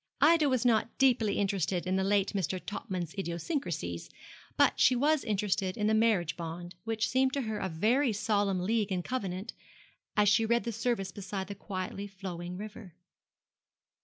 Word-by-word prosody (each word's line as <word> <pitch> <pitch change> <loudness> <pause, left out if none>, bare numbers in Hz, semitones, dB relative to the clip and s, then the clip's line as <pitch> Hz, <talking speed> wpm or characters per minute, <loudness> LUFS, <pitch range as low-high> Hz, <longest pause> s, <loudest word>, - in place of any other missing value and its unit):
Ida 310 -1 +5
was 255 -2 +1
not 230 -1 +2
deeply 240 -6 +3
interested 190 -3 0
in 185 +1 0
the 190 - +1
late 200 +1 +2
Mr. 185 -2 -1
Topman's 185 -6 -4
idiosyncrasies, 170 - -3 0.5
but - - +4
she 255 - +6
was 295 +4 +2
interested 200 -3 -1
in 210 - 0
the 215 - +3
marriage 215 -7 +2
bond, 175 +1 -6
which 225 -1 0
seemed 260 +1 +2
to 280 - 0
her 220 -2 -3
a 190 - -2
very 230 - +2
solemn 200 -3 +1
league 210 +1 0
and 180 -2 -1
covenant, 195 -6 -3 0.6
as 210 0 +5
she 220 +3 +5
read 235 +1 +2
the 235 - -2
service 225 -4 -1
beside 195 -1 -5
the - - -3
quietly 200 0 -5
flowing 180 -2 -6
river. 210 -3 -9
205 Hz, 165 wpm, -30 LUFS, 185-230 Hz, 0.6 s, she